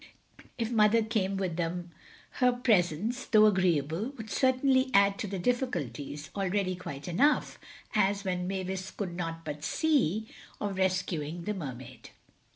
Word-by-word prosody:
If 230 Hz, 0 st, -2 dB
Mother 220 Hz, 0 st, +4 dB
came 205 Hz, -3 st, -1 dB
with 185 Hz, -4 st, -2 dB
them 175 Hz, 0 st, -3 dB, 0.5 s
her 250 Hz, -1 st, +5 dB
presence, 225 Hz, -, +1 dB
though 215 Hz, -1 st, +6 dB
agreeable, 185 Hz, -, +1 dB
would 220 Hz, -2 st, -8 dB
certainly 260 Hz, 0 st, +3 dB
add 200 Hz, 0 st, +4 dB
to 210 Hz, -, -2 dB
the 195 Hz, 0 st, -4 dB
difficulties, 150 Hz, -, -2 dB
already 195 Hz, -1 st, 0 dB
quite 145 Hz, -5 st, -7 dB
enough—as 205 Hz, -, 0 dB
even 180 Hz, -2 st, -2 dB
Mavis 190 Hz, 0 st, -3 dB
could 185 Hz, -4 st, -5 dB
not 165 Hz, -1 st, -4 dB
but 150 Hz, -1 st, -5 dB
see—of 220 Hz, -, -1 dB
rescuing 175 Hz, -4 st, -1 dB
the 210 Hz, -, -2 dB
Mermaid. 130 Hz, -, -8 dB
190 Hz, 130 wpm, -29 LUFS, 170-220 Hz, 0.5 s, though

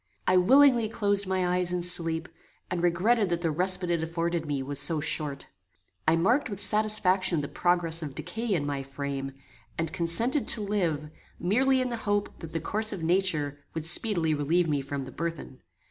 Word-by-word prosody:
I 185 Hz, -, +3 dB
willingly 240 Hz, +4 st, +5 dB
closed 200 Hz, -2 st, +1 dB
my 185 Hz, -1 st, 0 dB
eyes 180 Hz, 0 st, 0 dB
in 180 Hz, -1 st, -2 dB
sleep, 165 Hz, -1 st, +3 dB, 0.4 s
and 180 Hz, -1 st, -2 dB
regretted 190 Hz, +5 st, +2 dB
that 170 Hz, 0 st, -2 dB
the 165 Hz, -2 st, 0 dB
respite 180 Hz, +2 st, +1 dB
it 170 Hz, -2 st, 0 dB
afforded 165 Hz, 0 st, -3 dB
me 140 Hz, -2 st, -2 dB
was 140 Hz, +1 st, -2 dB
so 165 Hz, -3 st, +3 dB
short. 150 Hz, -2 st, -3 dB, 0.6 s
I 160 Hz, -, +4 dB
marked 235 Hz, -, +1 dB
with 200 Hz, -2 st, -6 dB
satisfaction 200 Hz, -6 st, +3 dB
the 145 Hz, -, -4 dB
progress 170 Hz, -1 st, 0 dB
of 145 Hz, -4 st, -7 dB
decay 220 Hz, +4 st, -3 dB
in 145 Hz, -4 st, -2 dB
my 140 Hz, -1 st, -3 dB
frame, 135 Hz, 0 st, -5 dB, 0.4 s
and 165 Hz, -1 st, -3 dB
consented 190 Hz, -, +1 dB
to 220 Hz, -, +3 dB
live, 170 Hz, -8 st, -2 dB, 0.3 s
merely 260 Hz, +9 st, +2 dB
in 255 Hz, -, -2 dB
the 235 Hz, -, -4 dB
hope 205 Hz, -2 st, -2 dB
that 165 Hz, -2 st, -8 dB
the 165 Hz, -, -3 dB
course 215 Hz, +6 st, +1 dB
of 190 Hz, -6 st, -6 dB
nature 160 Hz, -5 st, 0 dB, 0.2 s
would 160 Hz, -1 st, -3 dB
speedily 170 Hz, -2 st, +2 dB
relieve 160 Hz, +4 st, +1 dB
me 145 Hz, -3 st, 0 dB
from 135 Hz, 0 st, -5 dB
the -, -, -10 dB
burthen. 165 Hz, -5 st, -6 dB
175 Hz, 185 wpm, -27 LUFS, 155-200 Hz, 0.6 s, willingly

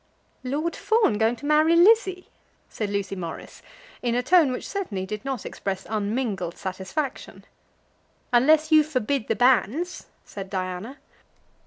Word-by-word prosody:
"Lord 295 Hz, +6 st, -2 dB
Fawn 440 Hz, -, +2 dB
going 225 Hz, +2 st, +2 dB
to 265 Hz, -, -11 dB
marry 305 Hz, +2 st, +4 dB
Lizzie!" 380 Hz, 0 st, +4 dB, 0.4 s
said 210 Hz, -2 st, -4 dB
Lucy 200 Hz, -1 st, -2 dB
Morris, 170 Hz, -3 st, -8 dB, 0.4 s
in 240 Hz, -1 st, 0 dB
a 245 Hz, -, 0 dB
tone 335 Hz, -5 st, +4 dB
which 250 Hz, -, -5 dB
certainly 220 Hz, -, -4 dB
did 210 Hz, +3 st, -6 dB
not 270 Hz, -4 st, -4 dB
express 195 Hz, -1 st, -4 dB
unmingled 210 Hz, -4 st, -2 dB
satisfaction. 190 Hz, +9 st, -5 dB, 0.9 s
"Unless 310 Hz, +6 st, +4 dB
you 310 Hz, -1 st, +8 dB
forbid 275 Hz, -4 st, -2 dB
the 225 Hz, -, 0 dB
banns," 255 Hz, -, +1 dB, 0.2 s
said 195 Hz, -2 st, -8 dB
Diana. 185 Hz, +7 st, -4 dB
245 Hz, 135 wpm, -24 LUFS, 200-310 Hz, 0.9 s, you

